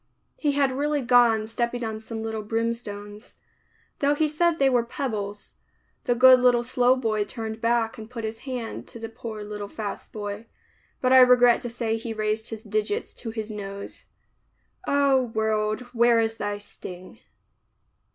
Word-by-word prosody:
He 290 -2 +1
had 280 -1 +2
really 290 +1 0
gone 235 -3 +4
stepping 235 +2 -2
on 220 -1 -3
some 220 0 -6
little 220 -1 -3
brimstones, 210 -1 -4 0.3
— - - -38
though 285 +1 +2
he 310 +1 +2
said 325 +2 +1
they 275 - +4
were 245 -3 +3
pebbles. 210 -5 -4 0.5
The 245 - +2
good 255 +1 +8
little 245 -1 +4
slow 250 +1 +3
boy 220 -4 0
turned 220 +1 -6
back 230 -1 +1
and 220 0 -9
put 235 -2 -6
his 220 0 -4
hand 250 -4 -5
to 235 - -10
the 225 0 -6
poor 220 -1 -7
little 210 0 -6
fast 205 0 -6
boy, 205 +1 -6 0.5
but 255 0 +3
I 260 - +9
regret 245 -1 +6
to 245 - -4
say 230 -1 -2
he 225 0 -5
raised 215 +1 -1
his 220 -1 -7
digits 210 -1 -2
to 230 - -6
his 220 -1 -5
nose 200 -1 -6 0.4
— - - -27
O, 280 -2 +4
world 220 -2 -1
where 235 0 +4
is 225 0 0
thy 205 0 -2
sting. 185 -3 -10
225 Hz, 170 wpm, -25 LUFS, 215-250 Hz, 0.5 s, I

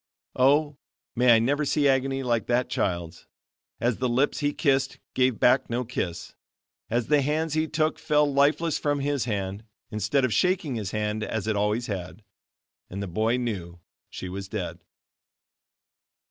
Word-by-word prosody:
Oh! 145 +2 +3 0.4
may 120 -1 +6
I - - +6
never 140 +6 +1
see 145 0 +2
agony 135 0 +1
like 120 -4 0
that 125 +1 +1
child's, 85 -7 -2 0.5
as 120 -1 0
the 125 -1 0
lips 130 +4 +1
he 145 0 +1
kissed 140 -3 +1 0.2
gave 130 -3 +2
back 130 +2 +4
no 120 +2 -1
kiss, 90 -8 -4 0.6
as 120 0 0
the 145 +3 +3
hands 150 +3 0
he 155 0 +1
took 155 0 0
fell 150 -1 +3
lifeless 145 +3 +2
from 145 -1 0
his 140 -3 0
hand, 100 -2 -3 0.3
instead 110 +6 +1
of 120 - -1
shaking 180 - +1
his 105 -5 -3
hand 105 +1 -2
as 105 -1 -3
it 110 -1 0
always 105 +4 0
had, 95 +1 -6 0.7
and 100 +2 -5
the - - -4
boy 110 +7 +1
knew 95 -8 -4 0.3
she 95 - -7
was 95 +1 -6
dead. - - -4
125 Hz, 160 wpm, -26 LUFS, 105-145 Hz, 0.7 s, may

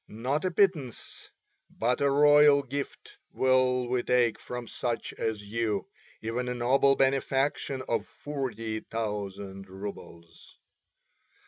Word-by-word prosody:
Not 130 - -2
a - - +2
pittance 170 - -1 0.4
but 125 +4 -1
a 140 - +4
royal 145 0 +6
gift 140 +1 -6 0.2
will 130 -1 +2
we 125 0 0
take 120 -2 +2
from 125 -1 -6
such 120 0 -3
as 110 -2 -3
you, 110 -2 -1 0.3
even 120 +3 -2
a 125 - -2
noble 135 +3 +3
benefaction 135 0 0
of 115 - -1
forty 115 -7 -4
thousand 100 -3 -5
roubles." 95 -3 -10
125 Hz, 115 wpm, -28 LUFS, 110-135 Hz, 0.4 s, royal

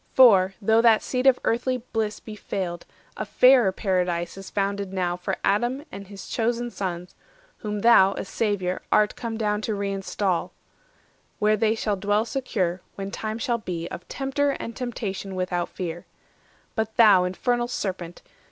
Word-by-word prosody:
For, 195 -7 +6
though 220 +2 +4
that 230 -2 +5
seat 255 +1 0
of 260 -2 +6
earthly 250 +2 0
bliss 225 -3 -3
be 215 - -9
failed, 180 -4 -4 0.3
A - - -2
fairer 250 -6 +5
Paradise 180 -3 -1
is 195 0 -9
founded 200 -1 -2
now 180 -2 -1
For 185 +2 -3
Adam 240 +8 +1
and 200 -1 -8
his 200 0 -10
chosen 240 +1 -1
sons, 180 -3 -5 0.4
whom 210 -1 -4
thou, 200 -4 +6
A - - -5
Saviour, 195 -4 -1
art 210 0 +3
come 230 -2 -4
down 210 -1 0
to 215 - -2
reinstall; 195 -2 -1 0.9
Where 215 +1 +3
they 220 +1 +2
shall 210 -2 -1
dwell 205 +3 +1
secure, 205 -8 -2
when 195 0 -5
time 215 +1 -4
shall 235 0 -1
be, 170 -5 -4
Of 175 - -8
tempter 280 +1 -1
and 230 -4 -4
temptation 200 -6 -4
without 180 -1 -1
fear. 175 -2 -6 0.7
But 220 -1 -2
thou, 210 -5 +7
Infernal 240 +7 0
Serpent! 185 -7 -5
205 Hz, 160 wpm, -25 LUFS, 185-230 Hz, 0.9 s, thou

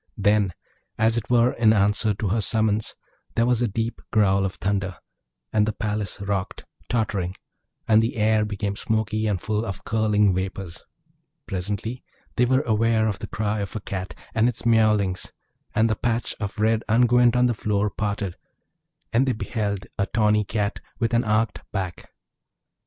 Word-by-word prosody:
Then, 100 -2 +2 0.4
as 110 +1 +3
it 115 -2 -3
were 120 0 +4
in 110 -2 +4
answer 105 0 +2
to 105 0 -2
her 110 +4 +1
summons, 110 +1 +1 0.4
there 115 - +3
was 125 -1 +2
a 120 - +2
deep 115 +3 -3
growl 100 -2 +3
of 95 - -3
thunder, 95 -2 -2 0.6
and 105 -1 +3
the 110 - 0
palace 105 -2 -3
rocked, 100 -2 -3 0.2
tottering; 100 -6 -1 0.5
and 110 0 +6
the 115 - -1
air 110 -1 +3
became 105 -1 -3
smoky 110 0 -1
and 100 -3 0
full 105 +3 -1
of 95 -4 -5
curling 105 -3 +2
vapours. 95 -1 -4 0.6
Presently 105 +6 -4 0.3
they 125 - +3
were 130 +2 +3
aware 110 -1 +2
of 100 -3 -2
the - - -6
cry 105 0 -2
of 100 +1 -5
a - - -1
Cat, 95 -1 -5 0.2
and 115 +2 +3
its 120 - -3
miaulings; 105 -5 +2 0.4
and 110 +1 +4
the 110 - +1
patch 120 +2 -1
of 105 +1 -4
red 110 +1 +2
unguent 120 +1 +4
on 125 0 +4
the 120 - +2
floor 105 -2 0
parted 100 -3 -3 0.8
and 125 +4 +3
they 130 - +2
beheld 100 -2 -3
a 100 - +1
tawny 105 -1 +2
Cat 105 +1 -2 0.2
with 115 0 0
an 115 - +3
arched 110 0 0
back. 95 -4 -4
105 Hz, 170 wpm, -24 LUFS, 100-115 Hz, 0.8 s, and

